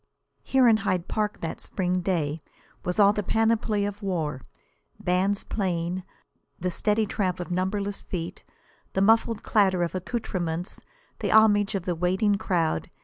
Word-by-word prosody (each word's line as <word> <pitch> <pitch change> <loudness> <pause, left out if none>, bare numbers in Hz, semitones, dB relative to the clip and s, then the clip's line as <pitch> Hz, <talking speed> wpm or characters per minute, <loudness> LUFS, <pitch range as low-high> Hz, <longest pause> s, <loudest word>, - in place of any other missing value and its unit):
Here 265 -2 +3
in 225 -2 +6
Hyde 185 -4 -1
Park 210 -1 -2
that 165 - -4
spring 180 -1 -1
day 165 -4 -1 0.4
was 180 +3 -2
all 200 0 +7
the 210 - -1
panoply 220 0 +1
of 205 +1 -5
war: 160 -9 -2 0.6
bands 190 +3 +1
playing, 180 -2 -2 0.6
the 180 +1 -1
steady 210 +4 +1
tramp 190 -3 -1
of 175 0 -5
numberless 200 +3 -1
feet, 170 -2 -6 0.5
the 190 - +1
muffled 225 +1 +3
clatter 190 -4 +3
of 170 - -2
accoutrements, 180 -4 -3 0.4
the - - -1
homage 210 -1 +5
of 185 -3 -3
the 180 - 0
waiting 185 +5 +1
crowd. 165 - 0
190 Hz, 145 wpm, -26 LUFS, 180-210 Hz, 0.6 s, all